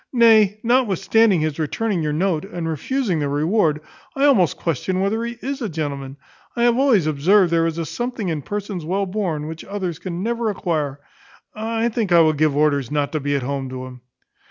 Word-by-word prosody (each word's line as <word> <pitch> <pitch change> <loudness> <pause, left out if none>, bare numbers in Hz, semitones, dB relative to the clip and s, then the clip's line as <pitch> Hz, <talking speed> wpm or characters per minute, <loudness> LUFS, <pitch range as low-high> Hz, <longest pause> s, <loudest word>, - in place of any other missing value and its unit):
Nay, 220 -4 +5
notwithstanding 225 -5 +3
his 155 0 -2
returning 185 +4 -1
your 150 -1 -1
note, 160 0 0
and 175 -4 -5
refusing 185 - -1
the 145 -1 -1
reward, 155 +1 +1 0.3
I 275 +1 +2
almost 195 - +3
question 175 +4 -2
whether 205 +4 0
he 235 0 -5
is 275 +1 -4
a 225 - -2
gentleman. 140 -4 -5 0.4
I 235 - 0
have 240 -1 +4
always 250 - +3
observed 170 +5 +3
there 165 0 +2
is 165 0 -3
a 165 - -2
something 240 +1 -4
in 155 -3 -2
persons 200 +1 -5
well 190 +5 -1
born, 180 -6 -2
which 160 +1 -7
others 185 -5 -4
can 180 0 -5
never 235 0 -1
acquire. 155 -8 -2 0.5
I 225 +1 -1
think 220 -4 -2
I 170 -1 +7
will 155 -1 +4
give 150 -1 +1
orders 145 -4 +2
not 145 -1 -1
to 155 - -1
be 145 0 -1
at 140 - -1
home 135 0 -3
to 130 0 -6
him." 125 -1 -11
175 Hz, 200 wpm, -21 LUFS, 150-220 Hz, 0.5 s, I